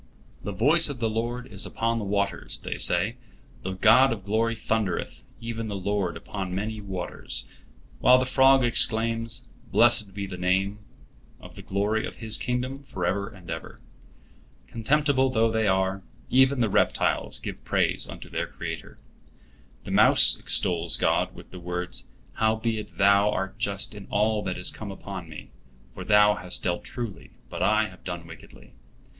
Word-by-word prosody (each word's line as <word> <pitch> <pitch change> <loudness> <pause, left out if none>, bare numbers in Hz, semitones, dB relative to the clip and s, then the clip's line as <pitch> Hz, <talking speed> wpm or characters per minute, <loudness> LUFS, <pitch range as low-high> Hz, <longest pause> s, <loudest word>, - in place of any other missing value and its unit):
"The 100 - -5
voice 150 - +4
of 140 - -5
the 115 -2 -1
Lord 120 +3 -3
is 105 -6 -5
upon 115 0 -2
the - - -4
waters," 100 -2 -1
they - - -6
say, - - +1 0.4
"the 95 - -4
God 115 +7 +5
of 100 -4 -5
glory 115 +2 0
thundereth, 110 -4 -3 0.2
even 115 -1 -5
the 105 - -4
Lord 100 -2 -2
upon 95 -3 -6
many 105 +2 -4
waters"; 90 -9 -3 0.5
while 125 0 +6
the 130 - 0
frog 135 0 +4
exclaims, 115 0 +3 0.3
"Blessed 110 -4 +3
be 100 -1 -4
the 95 -2 -8
name 95 +3 0 0.6
of - - -13
the - - -11
glory 105 +3 -1
of - - -10
His 110 -2 +2
kingdom 125 +2 -3
forever 100 -5 -3
and 95 -6 -16
ever." 80 -1 -7 0.9
Contemptible 135 +3 +1
though 115 -2 +1
they 110 -1 0
are, 95 0 0 0.3
even 130 0 +4
the 115 - +2
reptiles - - +1
give - - -8
praise - - 0
unto - - -10
their - - -3
Creator. - - -8 0.9
The - - -8
mouse - - +8
extols 85 -1 +2
God - - 0
with - - -14
the 90 - -9
words: 90 0 -4 0.3
"Howbeit 110 0 -1
Thou 100 +1 +4
art 95 0 -4
just 100 -2 -1
in 105 -1 -11
all 105 +1 +1
that 95 - -3
is 90 - +3
come 110 - -8
upon 95 -3 -8
me; 80 - -10 0.4
for - - -9
Thou 105 0 +4
hast 90 0 -2
dealt 85 -1 -2
truly, 115 -6 -7 0.2
but - - -6
I 110 0 +3
have 95 - -17
done 85 -2 -6
wickedly." 80 -1 -15
105 Hz, 160 wpm, -25 LUFS, 95-115 Hz, 0.9 s, mouse